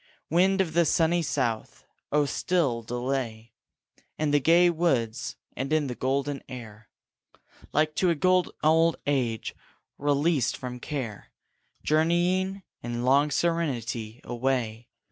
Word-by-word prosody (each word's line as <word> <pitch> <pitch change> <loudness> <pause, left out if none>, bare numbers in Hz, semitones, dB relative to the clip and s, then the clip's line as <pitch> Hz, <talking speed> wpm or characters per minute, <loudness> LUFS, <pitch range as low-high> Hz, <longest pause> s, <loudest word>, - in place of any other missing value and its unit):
Wind 190 +3 +4
of 165 -4 -2
the 170 +1 +4
sunny 165 +2 +2
south! 130 -8 -2 0.3
oh 150 0 +3
still 140 -5 0
delay 120 -2 -3 0.6
In 155 -1 0
the 145 - +4
gay 170 +5 +5
woods 120 -9 0 0.2
and 135 +3 -3
in 155 -1 +2
the 130 - -3
golden 135 +2 -1
air, 110 -4 -10 0.8
Like 155 +1 +2
to 185 - +3
a 170 - +2
good 185 +3 +3
old 160 +1 +4
age 125 -6 -1 0.5
released 145 -2 +1
from 125 -1 -6
care, 125 -8 -5 0.5
Journeying, 175 +5 +1 0.2
in 120 +1 -3
long 140 +3 +4
serenity, 125 -9 -1
away. 120 -2 -2
140 Hz, 125 wpm, -27 LUFS, 120-165 Hz, 0.8 s, gay